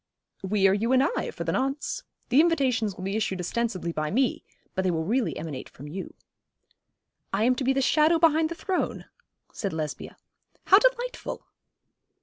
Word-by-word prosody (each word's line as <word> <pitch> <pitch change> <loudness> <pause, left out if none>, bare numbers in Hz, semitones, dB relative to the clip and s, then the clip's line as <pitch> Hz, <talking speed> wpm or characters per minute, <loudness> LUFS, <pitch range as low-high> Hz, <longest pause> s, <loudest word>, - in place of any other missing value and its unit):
'We 195 0 +2
are 190 - +4
you 225 +5 +1
and 260 +1 +5
I, 390 - -1
for - - -5
the - - -1
nonce. 270 +2 -1 0.3
The 260 +5 +6
invitations 255 - +1
will 185 - -8
be 195 +2 -2
issued 195 -4 -1
ostensibly 185 -2 -2
by 155 -1 -2
me, 250 - +1 0.3
but 190 - 0
they 185 - +2
will 160 -2 0
really 230 +7 0
emanate 150 -5 -6
from 145 - -11
you.' 185 +6 -7 1.2
'I 200 +3 +1
am 250 +2 +4
to 270 - -2
be 260 - +3
the 270 0 +1
shadow 310 +4 +4
behind 320 -1 +4
the 335 - -5
throne,' 375 +1 -2 0.5
said 200 -5 -3
Lesbia. 155 -2 -5 0.5
'How 390 - +7
delightful!' - - -1
235 Hz, 175 wpm, -26 LUFS, 190-295 Hz, 1.2 s, How